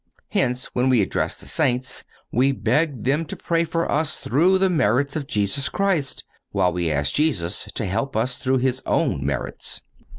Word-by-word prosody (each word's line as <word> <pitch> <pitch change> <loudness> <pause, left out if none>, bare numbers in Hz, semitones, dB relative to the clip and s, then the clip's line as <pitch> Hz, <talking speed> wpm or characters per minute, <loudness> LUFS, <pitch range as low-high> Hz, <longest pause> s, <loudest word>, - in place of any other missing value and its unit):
(207) - - +2
Hence, 125 - -6
when 125 +1 +2
we 125 -3 +4
address - - -2
the - - -10
saints, 125 0 0 0.3
we 130 +4 +3
beg 145 -2 0
them 145 +5 +2
to 160 - -6
pray 165 -1 0
for 165 0 -1
us 155 +1 0
through 175 +9 +3
the 190 0 +3
merits 140 - +2
of 150 -3 -3
Jesus 105 +2 0
Christ, 185 -9 0 0.3
while 90 - +1
we 85 -1 0
ask 75 -1 +1
Jesus 105 - 0
to 110 - -1
help 115 +9 -2
up 110 +3 +2
through 130 +1 0
His 130 0 0
own - - +1
merits. - - -3
130 Hz, 185 wpm, -23 LUFS, 115-155 Hz, 0.3 s, we